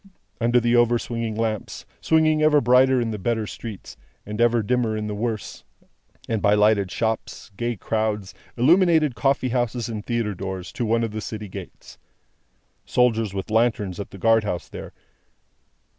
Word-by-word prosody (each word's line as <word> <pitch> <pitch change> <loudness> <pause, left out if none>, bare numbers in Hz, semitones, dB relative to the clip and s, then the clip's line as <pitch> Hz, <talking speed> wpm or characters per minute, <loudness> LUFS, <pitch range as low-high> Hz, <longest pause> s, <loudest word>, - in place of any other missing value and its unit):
Under 120 +1 +3
the 120 0 +2
over 120 0 +4
swinging 115 -2 -4
lamps 110 -1 -3 0.2
swinging 155 -1 +3
ever 155 -1 +5
brighter 130 +1 +4
in 115 -2 -1
the 105 - -4
better 110 +2 -1
streets, 105 -1 -8 0.3
and 105 +2 -4
ever 120 -1 +3
dimmer 115 0 0
in 105 - -3
the 105 - -3
worse 110 0 -4 0.6
and 110 -2 -1
by 105 0 +4
lighted 105 -2 +3
shops, 110 0 -3
gay 120 +3 -2
crowds, 105 -2 -2 0.2
illuminated 160 +1 +4
coffee 130 +2 +1
houses, 120 -1 -1
and 110 -2 -5
theatre 115 -3 -1
doors, 95 0 -6
to 120 - -3
one 115 +1 +2
of 115 - -2
the 110 0 -5
city 105 0 -6
gates. 95 - -11 0.8
Soldiers 115 -5 +1
with 95 +2 -5
lanterns, 110 -5 +1
at 100 - -5
the - - -11
guard 115 +3 +3
house 90 -4 -3
there. - - -9
115 Hz, 165 wpm, -23 LUFS, 105-120 Hz, 0.8 s, ever